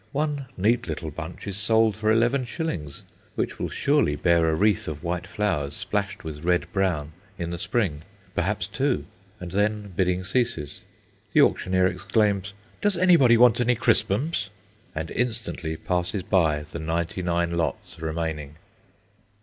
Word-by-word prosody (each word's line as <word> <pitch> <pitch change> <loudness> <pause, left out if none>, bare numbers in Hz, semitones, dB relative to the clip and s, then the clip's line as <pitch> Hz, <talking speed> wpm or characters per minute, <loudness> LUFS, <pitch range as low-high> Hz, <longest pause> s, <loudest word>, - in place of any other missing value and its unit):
One 145 -2 -1
neat 110 +4 +2
little 80 0 -4
bunch 80 +3 -7
is 100 -1 -4
sold 110 0 +3
for 110 +1 +1
11s., 120 - 0 0.3
which - - -2
will - - -2
surely 140 - +2
bear 85 +2 +3
a 80 - +2
wreath 105 +4 +2
of 75 -1 -5
white 90 +1 -2
flowers, 90 -10 -1
splashed 100 0 -3
with 75 -1 -7
red 90 -4 +2
brown, 85 -6 0 0.3
in 85 -1 -3
the 85 - -4
spring 90 -9 -1 0.3
perhaps 95 +1 0
two. 125 +7 -1 0.3
And 90 -1 -7
then 105 0 0
bidding 90 0 +1
ceases. 115 - -1 0.5
The - - +6
auctioneer 95 0 +3
exclaims, 100 0 +1 0.3
"Does 205 -3 +2
anybody 170 -10 +6
want 120 0 +6
any 125 0 +3
crispums?" 115 - +1 0.5
and 80 +1 -4
instantly 110 -9 -2
passes 90 +3 -1
by 80 -6 +2
the 80 +2 -8
ninety 85 +3 -2
nine 85 -1 0
lots 85 -1 -3
remaining. 80 -2 -3
95 Hz, 145 wpm, -25 LUFS, 85-110 Hz, 0.5 s, The